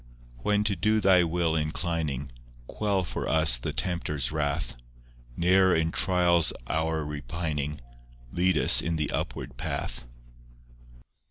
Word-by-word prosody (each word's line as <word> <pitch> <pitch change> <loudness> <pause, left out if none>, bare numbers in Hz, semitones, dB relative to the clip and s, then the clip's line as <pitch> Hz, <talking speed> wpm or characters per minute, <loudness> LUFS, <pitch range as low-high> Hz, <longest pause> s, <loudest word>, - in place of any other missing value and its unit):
IV - - -18
When 105 0 +2
to 105 -2 +1
do 110 +5 +1
Thy 95 -3 +5
will 85 -1 0
inclining, 75 -3 -2 0.3
Quell 100 - -1
for 85 - -4
us 80 -7 +4
the - - -3
tempter's 75 -7 -2
wrath; 75 -2 -2 0.6
Ne'er 95 +2 +4
in 80 0 0
trial's 85 -4 +2
hour 80 +2 -1
repining, 75 0 -4 0.5
Lead 90 +1 +2
us - - +6
in 85 0 -2
the 75 -2 -2
upward 65 -1 -4
path. - - -4
80 Hz, 125 wpm, -27 LUFS, 75-90 Hz, 0.6 s, us